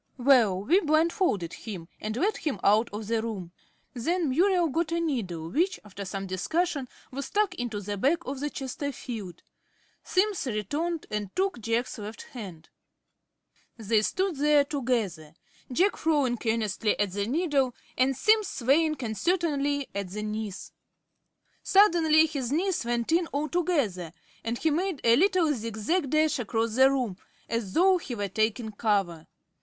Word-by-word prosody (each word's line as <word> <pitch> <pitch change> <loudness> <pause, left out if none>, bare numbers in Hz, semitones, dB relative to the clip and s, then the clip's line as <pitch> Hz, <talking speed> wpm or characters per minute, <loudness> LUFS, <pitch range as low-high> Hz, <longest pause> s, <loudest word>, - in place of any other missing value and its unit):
Well, 240 -8 +4
we 345 - +4
blindfolded 310 - +1
him, 190 -7 -7
and 215 +2 -4
led 405 +9 +1
him 280 - -3
out 215 +3 +4
of 210 +1 -5
the 225 +1 0
room. 200 -7 -5 0.4
Then 320 +6 0
Muriel 355 +3 +3
got 325 +3 -1
a 335 - +1
needle, 190 - -3
which, 350 - +1
after 200 -1 -8
some 195 +1 -4
discussion, 280 - -1 0.2
was 275 +1 -5
stuck 415 -2 +1
into 240 - -4
the 205 0 -4
back 315 - +1
of 270 +1 -4
the 295 +1 -2
Chesterfield. 245 - -6 0.6
Simms 390 -5 0
returned 290 - -2
and 210 -2 -2
took 380 -7 0
Jack's 230 +2 -1
left 210 +2 -7
hand. 185 -10 -10 1.1
They 220 -1 +2
stood 370 - -1
there 295 0 +4
together, 225 - -2 0.4
Jack 370 +11 +2
frowning 285 -7 +1
earnestly 220 -1 0
at 205 -2 +1
the 200 +2 -2
needle, 280 -3 +1 0.2
and 260 0 +2
Simms 435 -1 +4
swaying 305 +6 +2
uncertainly 285 - 0
at 200 -2 -4
the 210 +3 -5
knees. 215 -2 -5 0.9
Suddenly 330 -6 +5
his 275 -6 -3
knees 355 +2 0
went 235 +3 -1
in 335 +1 +3
altogether, 285 - -1 0.3
and 230 +1 -2
he 320 - +1
made 350 0 -1
a 230 0 +6
little 355 -1 +3
zig 225 -3 -5
zag 285 - 0
dash 310 -1 +2
across 225 -1 -1
the 260 +3 +6
room, 250 -9 -1 0.3
as 230 -5 -3
though 370 +1 +4
he 260 -7 -6
were 205 -2 -3
taking 220 +3 0
cover. 200 -7 -1
255 Hz, 150 wpm, -27 LUFS, 210-320 Hz, 1.1 s, a